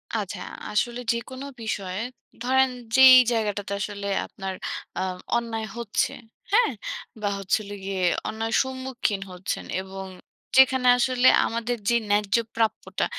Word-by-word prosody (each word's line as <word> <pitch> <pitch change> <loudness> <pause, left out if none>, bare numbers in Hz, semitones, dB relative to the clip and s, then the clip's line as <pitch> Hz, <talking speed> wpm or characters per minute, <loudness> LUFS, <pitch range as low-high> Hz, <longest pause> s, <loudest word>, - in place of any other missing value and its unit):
আচ্ছা। - - -3 0.3
আসলে 240 +3 0
যেকোনো 260 +3 -5 0.2
বিষয়ে 200 -2 -3 0.4
ধরেন 265 +1 +4 0.3
যেই 260 -1 +10 0.2
জায়গাটাতে 205 -3 -1
আসলে 200 -1 -4 0.2
আপনার 195 -1 -6 0.4
আ - - 0 0.4
অন্যায় 225 -2 -3
হচ্ছে, 230 -3 0 0.4
হ্যাঁ? 465 +2 +4 0.5
বা 205 - 0
হচ্ছিলো 200 +1 -1
গিয়ে 195 -1 -3 0.3
অন্যায়ের 225 +1 -2
সম্মুখীন 260 -6 -3
হচ্ছেন 180 +1 -4 0.2
এবং 190 0 -8 0.5
যেখানে 260 -1 +6
আসলে 250 0 +3 0.2
আমাদের 235 +1 -2
যে 235 - +3 0.2
ন্যায্য 205 0 +2 0.2
প্রাপ্যটা, 225 -1 0
225 Hz, 120 wpm, -25 LUFS, 200-255 Hz, 0.5 s, যেই